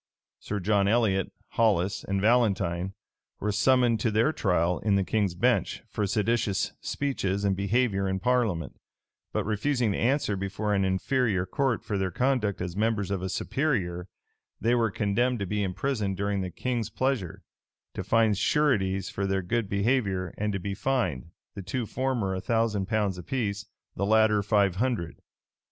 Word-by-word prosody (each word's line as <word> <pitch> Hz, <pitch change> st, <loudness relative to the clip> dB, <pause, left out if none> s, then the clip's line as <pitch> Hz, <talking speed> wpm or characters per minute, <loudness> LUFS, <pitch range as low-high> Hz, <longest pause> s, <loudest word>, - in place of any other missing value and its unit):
Sir 105 Hz, -, -4 dB
John 100 Hz, +1 st, +2 dB
Elliot, 100 Hz, -4 st, +2 dB, 0.2 s
Hollis, 105 Hz, -2 st, +1 dB
and 100 Hz, 0 st, -1 dB
Valentine, 95 Hz, -5 st, +1 dB, 0.4 s
were 105 Hz, -, -1 dB
summoned 120 Hz, +2 st, +3 dB
to 115 Hz, -, +1 dB
their 110 Hz, +8 st, +2 dB
trial 90 Hz, -, +1 dB
in 105 Hz, -2 st, +1 dB
the 100 Hz, -, +2 dB
king's 100 Hz, -3 st, 0 dB
bench, 120 Hz, +6 st, +1 dB
for 105 Hz, -2 st, -2 dB
seditious 105 Hz, 0 st, 0 dB
speeches 100 Hz, -8 st, -2 dB
and 100 Hz, -1 st, +2 dB
behavior 100 Hz, 0 st, +1 dB
in 95 Hz, 0 st, -1 dB
parliament; 105 Hz, -, 0 dB, 0.5 s
but -, -, -1 dB
refusing 115 Hz, +2 st, 0 dB
to -, -, -2 dB
answer 125 Hz, -4 st, +1 dB
before 100 Hz, +2 st, -2 dB
an 100 Hz, -1 st, +2 dB
inferior 95 Hz, +1 st, +1 dB
court 130 Hz, +5 st, 0 dB
for 100 Hz, -2 st, -2 dB
their 95 Hz, -1 st, 0 dB
conduct 125 Hz, -3 st, 0 dB
as 90 Hz, -1 st, -4 dB
members 105 Hz, -2 st, 0 dB
of 95 Hz, -2 st, -1 dB
a 95 Hz, -, -3 dB
superior, 95 Hz, -, -1 dB, 0.5 s
they 115 Hz, +2 st, +2 dB
were 115 Hz, -2 st, +2 dB
condemned 120 Hz, +5 st, 0 dB
to 100 Hz, -, -3 dB
be 105 Hz, +2 st, -1 dB
imprisoned 100 Hz, +1 st, -1 dB
during 100 Hz, 0 st, -1 dB
the 90 Hz, -, -3 dB
king's 120 Hz, +5 st, -2 dB
pleasure, 130 Hz, -10 st, -2 dB, 0.5 s
to -, -, -4 dB
find 110 Hz, -3 st, +2 dB
sureties 100 Hz, -, +1 dB
for 100 Hz, 0 st, -2 dB
their 95 Hz, -1 st, 0 dB
good 110 Hz, +3 st, -1 dB
behavior, 100 Hz, -4 st, 0 dB
and 105 Hz, 0 st, -1 dB
to 100 Hz, -, -2 dB
be 100 Hz, +2 st, -4 dB
fined, 100 Hz, -, -1 dB, 0.2 s
the 100 Hz, -, -6 dB
two 115 Hz, +6 st, -3 dB
former 120 Hz, -5 st, -1 dB
a 95 Hz, -, -3 dB
thousand 110 Hz, -3 st, 0 dB
pounds 105 Hz, -4 st, 0 dB
apiece, 105 Hz, 0 st, -3 dB, 0.3 s
the 100 Hz, -, -1 dB
latter 110 Hz, -1 st, +4 dB
five 100 Hz, -3 st, +2 dB
hundred. 115 Hz, -8 st, -1 dB
105 Hz, 165 wpm, -27 LUFS, 95-115 Hz, 0.5 s, latter